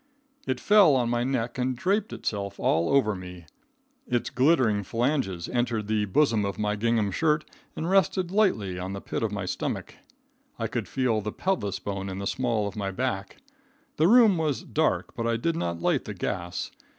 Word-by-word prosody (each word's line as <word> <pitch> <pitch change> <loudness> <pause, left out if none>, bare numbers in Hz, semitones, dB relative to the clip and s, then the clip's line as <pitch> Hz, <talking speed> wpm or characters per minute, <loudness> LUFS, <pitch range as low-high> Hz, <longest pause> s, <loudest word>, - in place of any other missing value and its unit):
It 130 -1 -1
fell 200 -7 +6
on 120 -2 +1
my 120 0 +1
neck 125 -1 -2
and 125 0 0
draped 200 - 0
itself 100 -2 -4
all 85 +1 +2
over 125 -6 +3
me. 90 -2 -9 0.6
Its 120 -1 -1
glittering 130 -7 +3
phalanges 115 - -1
entered 120 -3 -1
the 105 -1 +1
bosom 110 +1 +2
of 100 -1 -3
my 105 0 0
gingham 110 -1 +1
shirt 150 - +1 0.3
and 160 - -3
rested 185 -1 +2
lightly 110 - +1
on 95 +2 -4
the 100 - -4
pit - - -4
of 110 -2 0
my 100 -2 -3
stomach. - - -3 0.6
I - - -2
could - - -3
feel 125 -5 0
the 105 +1 -4
pelvis 135 - -1
bone 95 -1 -4
in 95 - -5
the 100 - -4
small 115 -2 0
of 100 - -7
my 100 -2 -2
back. 95 +1 -3 0.6
The 155 - +4
room 220 -3 +6
was 150 -4 -1
dark, - - 0
but 115 - -2
I 115 0 +1
did 165 +8 -1
not 85 - -3
light - - +1
the - - -6
gas. 90 0 -3
115 Hz, 185 wpm, -26 LUFS, 100-145 Hz, 0.6 s, fell